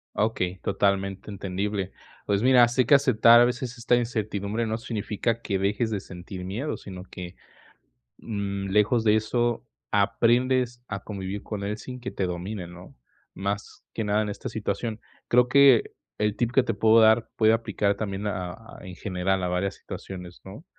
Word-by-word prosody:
Okey, 95 -4 0
totalmente 100 0 0
entendible. 100 0 -3 0.3
Pues, 100 0 +1
mira, 125 -1 +6
sé 125 +1 +1
que 145 - +6
aceptar, 120 -4 +6
a 120 - +7
veces, 125 0 -3
esta 120 0 +2
incertidumbre, 110 -2 -2
no 110 0 -2
significa 115 0 -2
que 100 -4 -1
dejes 105 +4 0
de 105 - -1
sentir 90 0 -9
miedo, 115 +11 -3
sino 90 -2 -9
que, 90 -1 -9 0.8
mm, 100 -2 -4
lejos 105 +4 +3
de 105 -1 +4
eso, 120 +3 0 0.3
aprendes 120 +4 +2
a 100 -1 -5
convivir 100 -1 -5
con 105 -2 -5
él, 105 +1 -2
sin 125 +2 -8
que 125 +1 -6
te 95 - -2
domine, 90 +2 -4
¿no?, 90 +1 -13 0.4
más 100 +1 -5
que 110 - -2
nada, 105 +1 +1
en 105 - -2
esta 100 - -5
situación. 110 +1 -3 0.3
Creo 125 +1 +5
que 135 -3 +5 0.2
el 105 0 0
tip, 120 -1 0
que 130 +1 +4
te - - -1
puedo 110 +1 +5
dar, 110 +1 +4
puede 110 0 +5
aplicar 105 -3 0
también 100 -1 -3
a 90 -3 -3
a 115 0 -14
en 90 -2 -9
general, 95 0 -1
a 90 - 0
varias 95 +2 -1
situaciones, 90 -2 -9
¿no? 105 - -11
105 Hz, 175 wpm, -26 LUFS, 95-115 Hz, 0.8 s, a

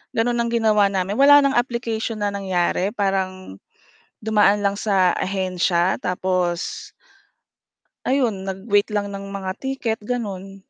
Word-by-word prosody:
gano'n 240 +1 +1
ang 235 - -1
ginawa 215 -3 +3
namin 195 0 -2
wala 285 0 +7
ng 275 - +2
application 235 -3 -2
na 205 - -1
nangyari 190 -1 0
parang 185 - -2 0.6
dumaan 210 -1 +3
lang 200 - +2
sa 190 -4 +2
ahensya 185 -2 0
tapos 180 -1 -2 1.2
Ayun, 230 -8 0
nag-wait 200 +2 0
lang 200 -1 -1
ng 195 0 -7
mga 195 -1 -4
ticket, 265 -4 -3
ganun. 205 -4 -5
200 Hz, 125 wpm, -21 LUFS, 190-225 Hz, 1.2 s, wala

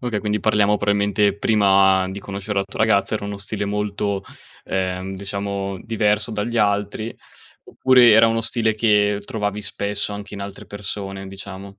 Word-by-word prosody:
Okay, 120 -4 -2
quindi 105 +1 -1
parliamo 105 0 +2
probabilmente, 100 0 +1
prima 95 -3 +4
di 95 - -6
conoscere 100 +1 -4
la 100 - +1
tua 100 - -8
ragazza, 105 -2 +2
era 105 - -3
uno 100 0 -5
stile 100 +1 -3
molto, 100 -1 -2 0.4
ehm, 95 0 -3
diciamo 100 0 -4
diverso 105 -1 0
dagli 110 +2 -2
altri? 105 +2 0 0.5
Oppure, 125 -2 +5
era 110 +1 +7
uno 115 0 0
stile 110 -1 0
che 105 -2 +2
trovavi 105 -1 -3
spesso 100 0 -2
anche 100 0 -7
in 100 - -7
altre 100 -1 -9
persone, 100 -1 -5
diciamo, 100 0 -9
100 Hz, 160 wpm, -21 LUFS, 100-105 Hz, 0.5 s, era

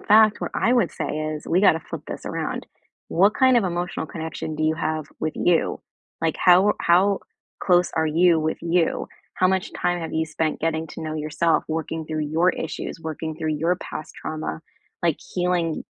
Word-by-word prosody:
fact, 215 0 +5
what - - -3
I 235 - +2
would 235 -11 +3
say - - -4
is 155 0 -3
we 175 - +2
gotta 165 -5 +5
flip - - -7
this - - -7
around: - - -3 0.4
what 195 +5 +4
kind 260 -1 +5
of 220 - 0
emotional 175 -2 -2
connection 160 0 -5
do 155 - -2
you 155 0 +2
have 155 -1 -2 0.2
with 155 0 -2
you? 175 -2 +1 0.4
Like, 165 -1 +1
how 185 +3 +6
how 190 +3 +4 0.4
close 180 -1 +3
are 160 0 +1
you 165 +1 +4
with 155 0 -1
you? 170 0 +1 0.3
How 185 - +3
much 190 +1 0
time 175 0 0
have 165 - -5
you 160 0 +1
spent 155 0 -2
getting 160 0 -1
to - - -8
know 155 -1 -4
yourself 155 +2 +1
working 160 0 -3
through 155 -1 -2
your 165 +4 +3
issues, 160 - -5
working 160 0 -5
through 155 -1 -1
your 165 +4 +1
past 155 - -7
trauma, 155 0 -5 0.4
like 170 -3 +1 0.2
healing 175 -3 0
165 Hz, 190 wpm, -23 LUFS, 155-180 Hz, 0.4 s, how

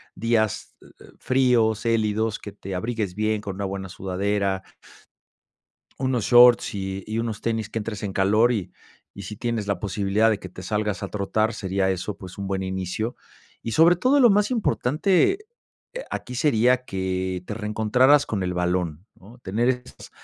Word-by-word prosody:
días, 115 -2 0
e - - -17 0.2
eh, - - -18
fríos, 120 -5 +2
gélidos, 110 -1 0
que 105 - -8
te 95 -1 -7
abrigues 105 -1 -3
bien 110 0 0
con 100 -2 -6
una 100 +1 -3
buena 95 0 -5
sudadera 95 0 -1 1.4
unos 130 -4 0
shorts 120 -2 +6
y 95 -1 -4
y 110 +1 -3
unos 115 -2 -3
tenis, 110 -2 -2
que 115 - -3
entres 105 -1 -5
en 100 -2 -3
calor 105 +6 +3
y 105 -7 -3 0.4
y 100 - -7
si 105 +3 -7
tienes 115 -3 -3
la 100 -3 0
posibilidad 100 +3 +1
de 110 -2 0
que 95 - -8
te 95 +1 -11
salgas 105 +1 -2
a - - -4
trotar, 110 +2 -1
sería 95 0 -1
eso, 95 +2 -3
pues, 95 -1 -10
un 100 -1 -5
buen 95 0 -2
inicio, 95 +5 -3 0.5
y, 115 - -4
sobre 165 +8 +5
todo, 255 +11 +3
lo 250 -3 +7
más 205 +1 +3
importante, 200 - +2 0.7
aquí 125 - -5
sería 125 -1 +2
que 95 -2 -2
te - - -4
reencontraras 110 +7 +3
con 100 -3 -2
el 90 -1 -2
balón, 90 -1 -1
¿no?, 110 +6 -16
tener 115 +2 -1
esas 125 -1 -4
105 Hz, 170 wpm, -24 LUFS, 95-120 Hz, 1.4 s, lo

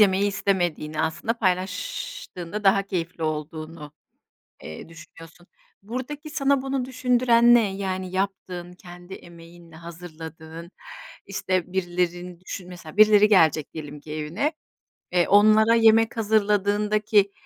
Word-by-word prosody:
yemeyi 200 -1 +4
istemediğini 175 -6 -1
aslında 160 +9 -1
paylaştığında 195 - -3
daha 195 0 +4
keyifli 175 -3 -5
olduğunu, 155 0 -5 0.7
eee, 80 - -9
düşünüyorsun. 165 +1 -15 0.4
Buradaki 265 +8 -6
sana 280 -3 +1
bunu 270 -2 -2
düşündüren 245 -2 +3
ne? 205 -5 +2
Yani, 185 -2 -4
yaptığın, 185 -2 -4
kendi 175 +1 -12
emeğinle 170 -1 -14
hazırladığın, 165 0 -10 0.6
işte, 185 -1 -2
birilerini 175 -1 -2
düşün 185 -1 -8
Mesela, 175 -1 -11
birileri 210 0 +6
gelecek 160 -7 +3
diyelim 150 -2 -8
ki 150 +1 -10
evine, 155 - -2 0.6
eee, 175 -1 +2
onlara 215 +2 +5
yemek 225 +1 +4
hazırladığındaki, 210 -1 +2
185 Hz, 110 wpm, -24 LUFS, 170-215 Hz, 0.7 s, birileri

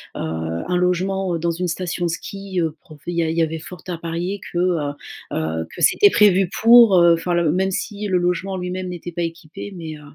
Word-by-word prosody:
un 80 - -3
logement, 180 +1 0
heu, - - -3
dans 170 +1 0
une 180 +2 -2
station 175 +1 -2
de - - 0
ski, 195 +2 -5
heu, 160 -2 -1
profé 155 +2 -9
il 170 - -4
y 170 - +3
a 160 - -1
il 165 - -3
y 165 - +4
avait 160 0 -2
fort 165 +1 -10
à 175 -2 -3
parier 170 +4 -4
que, - - -4
heu 180 0 +2 0.5
heu, 80 +1 -2
que - - -8
c'était 410 - +6
prévu 195 - +4
pour, 230 -4 +8
heu, 170 0 +6
enfin 165 +2 -1
le 170 -3 +2
même 190 +3 0
si 210 +2 -3
le 185 -2 +2
logement 180 +2 -1
en - - -3
lui-même 180 0 -4
n'était 175 0 -7
pas 175 - -4
équipé. 165 +3 -7
Mais, 165 -3 -6
heu, - - -15
175 Hz, 235 wpm, -21 LUFS, 165-185 Hz, 0.5 s, pour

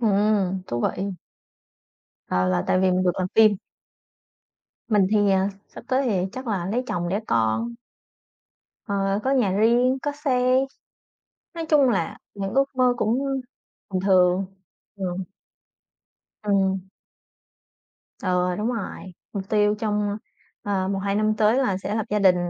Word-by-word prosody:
Ừm, 200 -3 +2
thú 120 0 -3
vị. 190 - -1 1.2
Ờ, 90 0 +1
là 90 -1 +1
tại 185 - +2
vì 190 - +3
mình 185 0 +2
được 180 - +3
làm 185 - 0
phim? 215 -2 +6 1.3
Mình 205 -4 +4
thì, 205 -2 +3
ờ, 190 0 +2 0.2
sắp - - -12
tới 265 +1 +1
thì 190 -5 +1
chắc 260 0 -7
là 195 -6 -1
lấy 230 +6 -1
chồng 175 -5 -2
đẻ 200 +4 -1
con. 115 - 0 1.1
Ờ, 200 -1 0
có 265 - +1
nhà 245 -8 +2
riêng, 240 +6 +3
có 290 - -1
xe, 255 -3 +2 1.0
nói 330 -1 -4
chung 290 -4 +5
là 190 -7 -1 0.2
những 195 -1 -4
ước 275 +1 +5
mơ 250 -1 +4
cũng 230 +1 +1 0.7
bình 185 - 0
thường. 185 0 +3 0.5
Ừm. 185 -1 -3 1.2
Ừm. 195 -2 +1 1.3
Ừ, 180 -1 +1
đúng 220 +4 0
rồi, 195 -4 -6 0.2
mục 195 -1 -5
tiêu 210 -1 +3
trong, 210 -1 -1 0.5
ờ, 195 -2 -1
1-2 200 0 -1
năm 215 +1 +2
tới 215 +3 +3
là 250 -8 +1
sẽ 195 +2 -4
lập 220 -1 -1
gia 210 - +2
đình. 190 -3 +5
200 Hz, 145 wpm, -24 LUFS, 185-230 Hz, 1.3 s, phim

